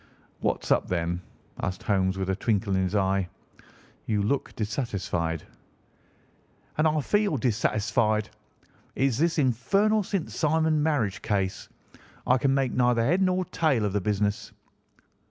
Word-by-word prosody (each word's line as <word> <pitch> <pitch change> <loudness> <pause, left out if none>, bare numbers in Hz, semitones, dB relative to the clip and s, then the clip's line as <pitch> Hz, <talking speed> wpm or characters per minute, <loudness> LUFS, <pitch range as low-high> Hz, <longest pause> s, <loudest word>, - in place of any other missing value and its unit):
"What's - - -1
up, - - +3
then?" 85 0 -1 0.4
asked 95 0 -3
Holmes 95 -2 +1
with 95 -1 -2
a - - 0
twinkle 100 -1 0
in 95 - +2
his 95 +2 -1
eye. 95 -2 +1 0.8
"You 105 -2 +1
look 135 +7 -1
dissatisfied." 100 - -2 1.3
"And 155 +1 +3
I 155 -1 +1
feel 205 0 +1
dissatisfied. 110 -2 +1 0.6
It - - 0
is 135 -2 +1
this 165 +1 +2
infernal 195 - +2
St. 195 -3 -3
Simon 160 0 +1
marriage 120 -12 0
case. 95 -2 -2 0.6
I 125 +1 +3
can 135 +1 +2
make 135 -3 0
neither 120 -2 +2
head 175 +9 +2
nor 185 -1 +2
tail 145 -11 +1
of 100 - -1
the 105 - 0
business." 105 +1 -1
115 Hz, 140 wpm, -27 LUFS, 100-150 Hz, 1.3 s, up